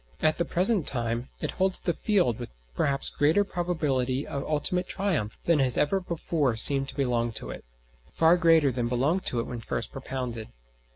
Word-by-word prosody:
At 155 Hz, +1 st, +1 dB
the 170 Hz, -, +1 dB
present 185 Hz, +1 st, +3 dB
time 120 Hz, -1 st, 0 dB
it -, -, -2 dB
holds 190 Hz, 0 st, +1 dB
the 175 Hz, -, -1 dB
field 180 Hz, -, 0 dB
with -, -, -6 dB, 0.2 s
perhaps 140 Hz, -, -1 dB
greater 155 Hz, +8 st, +2 dB
probability 150 Hz, -8 st, -2 dB
of 140 Hz, -, -5 dB
ultimate 175 Hz, +4 st, -1 dB
triumph 175 Hz, -, -2 dB
than 170 Hz, -3 st, +2 dB
has 130 Hz, -2 st, +1 dB
ever 195 Hz, +7 st, +1 dB
before 160 Hz, -7 st, -2 dB
seemed 135 Hz, +4 st, +5 dB
to -, -, -8 dB
belong 120 Hz, -4 st, 0 dB
to -, -, -4 dB
it -, -, -9 dB, 0.5 s
far 165 Hz, +1 st, +4 dB
greater 165 Hz, -5 st, +4 dB
than 120 Hz, -1 st, -2 dB
belonged 140 Hz, +10 st, 0 dB
to 120 Hz, -, 0 dB
it -, -, -1 dB
when 120 Hz, -, -6 dB
first 115 Hz, 0 st, -5 dB
propounded. 125 Hz, -4 st, -6 dB
145 Hz, 180 wpm, -27 LUFS, 125-175 Hz, 0.5 s, seemed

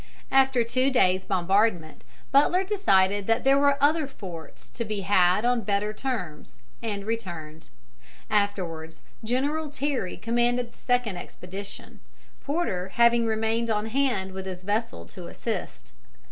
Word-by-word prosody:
After 265 Hz, -2 st, +4 dB
two 255 Hz, +3 st, +1 dB
days' 190 Hz, -8 st, +2 dB
bombardment, 185 Hz, -2 st, +1 dB, 0.3 s
Butler 320 Hz, +7 st, +4 dB
decided 205 Hz, -, +2 dB
that 225 Hz, +1 st, +2 dB
there 275 Hz, +1 st, +5 dB
were 280 Hz, -1 st, +4 dB
other 300 Hz, +1 st, +3 dB
forts 175 Hz, -, -9 dB
to 235 Hz, -, -4 dB
be 215 Hz, -2 st, -3 dB
had 185 Hz, +1 st, +3 dB
on 245 Hz, -1 st, +2 dB
better 205 Hz, +1 st, -1 dB
terms, 215 Hz, -, -5 dB, 0.2 s
and 205 Hz, -3 st, -4 dB
returned. 170 Hz, -9 st, -5 dB, 0.6 s
Afterwards 175 Hz, -6 st, -2 dB, 0.2 s
General 285 Hz, +7 st, -1 dB
Terry 275 Hz, -9 st, -2 dB
commanded 240 Hz, +1 st, 0 dB
the -, -, -26 dB
second 245 Hz, -6 st, 0 dB
expedition, 190 Hz, +3 st, -9 dB, 0.4 s
Porter 275 Hz, -, -1 dB
having 235 Hz, 0 st, +4 dB
remained 225 Hz, +1 st, 0 dB
on 210 Hz, -1 st, 0 dB
hand 225 Hz, -6 st, 0 dB
with 190 Hz, 0 st, -6 dB
his 185 Hz, -1 st, -6 dB
vessels 200 Hz, -, -3 dB
to -, -, -8 dB
assist. -, -, -5 dB
220 Hz, 130 wpm, -26 LUFS, 190-255 Hz, 0.6 s, there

